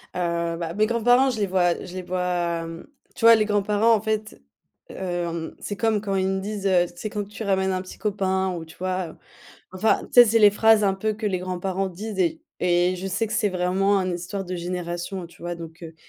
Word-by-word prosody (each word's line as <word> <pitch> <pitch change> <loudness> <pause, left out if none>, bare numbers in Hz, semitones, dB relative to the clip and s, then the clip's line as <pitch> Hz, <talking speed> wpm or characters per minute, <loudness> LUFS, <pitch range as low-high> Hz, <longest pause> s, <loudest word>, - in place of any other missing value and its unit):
Heu, 170 -1 -1
bah, 165 -1 -4
mes 215 +3 +2
grands-parents, 245 +3 +3
je 225 - -4
les 205 - +1
vois 180 -2 +2
je 180 - -10
les 185 - -3
vois, 175 -2 -1
hem, 165 0 -8 0.3
tu 230 - -1
vois? 230 0 +10
Les 215 -1 +2
grands-parents, 210 +2 +2
en 210 - -1
fait, 215 0 -3 0.5
hem, 170 -3 -4
c'est 205 - -5
comme 220 -1 +1
quand 200 -2 -2
ils 190 0 +1
me 190 - -1
disent: 200 0 -5
«Heu, 180 -2 +4
c'est 215 +5 -5
quand 205 -1 -4
tu 210 +2 -7
ramènes 190 -2 +1
un 185 - -1
petit 185 - -11
copain?» 190 -2 0
Ou, 165 - -7
tu 160 - -16
vois? 185 -1 -2
Heu, - - -13 0.6
enfin, 200 +4 +2
tu - - -23
sais, - - +5
c'est 230 0 +3
les 210 -2 +7
phrases 220 +1 +4
un 195 -1 +2
peu 215 +3 -1
que 215 +1 -4
les 190 -3 0
grands-parents 185 +1 -2
disent 200 +3 -7
et 170 -4 +1 0.2
et 180 +1 +2
je 185 +2 -5
sais 205 +4 -1
que - - -6
c'est 215 -2 +1
vraiment 190 +2 +1
un 185 -1 -1
histoire 180 +3 -4
de 180 0 -4
génération, 175 +1 -4
heu, - - -7
tu 170 - -18
vois? 175 0 -3
Donc 165 0 -10
heu, 160 -1 -9
190 Hz, 240 wpm, -24 LUFS, 175-210 Hz, 0.6 s, vois